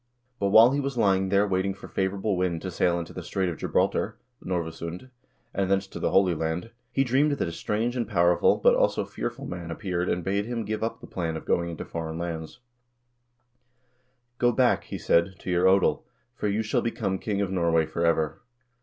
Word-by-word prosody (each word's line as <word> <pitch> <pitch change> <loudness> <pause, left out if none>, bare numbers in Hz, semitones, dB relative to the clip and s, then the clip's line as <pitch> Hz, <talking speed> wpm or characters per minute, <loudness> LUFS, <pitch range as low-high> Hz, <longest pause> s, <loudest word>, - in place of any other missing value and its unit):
" 120 +1 -45
But 100 - +1
while 110 +5 +7
he 140 - 0
was 140 -2 -3
lying 95 -3 +2
there 100 +1 +3
waiting 95 0 0
for - - -11
favorable 95 +1 -1
wind 90 -2 -1
to 95 - -4
sail 85 0 +1
into 85 -1 -6
the 90 - -6
Strait 90 +2 -1
of 85 - -5
Gibraltar - - 0 0.3
(Norvasund), 85 +5 -4 0.4
and 95 -1 0
thence 100 0 +2
to 95 - -9
the - - 0
Holy 95 -2 +4
Land, 80 +6 -3 0.2
he 135 - +2
dreamed 135 +4 +2
that 140 - -1
a - - -4
strange 110 +7 -2
and 120 -3 -1
powerful, 85 -3 +4
but - - +5
also - - +2
fearful - - -5
man 85 -1 -6
appeared 90 +1 -2
and 90 - -1
bade 100 +3 -1
him 120 -2 -3
give 110 +1 -3
up 115 - -3
the - - -9
plan 80 -3 -3
of - - -9
going 85 0 +1
into 85 - -6
foreign 80 -1 -5
lands: 85 +5 -5 1.8
"Go 120 0 +4
back," 125 +1 +2
he - - -5
said, 85 +3 +2
"to 90 - -5
your 90 0 +2
odel, 95 0 +3 0.3
for 105 - -3
you 105 +2 0
shall 110 - 0
become 100 -5 -2
king 105 -2 -2
of 100 -2 -1
Norway 85 -3 +2
forever." 85 -2 0
95 Hz, 205 wpm, -26 LUFS, 85-110 Hz, 1.8 s, while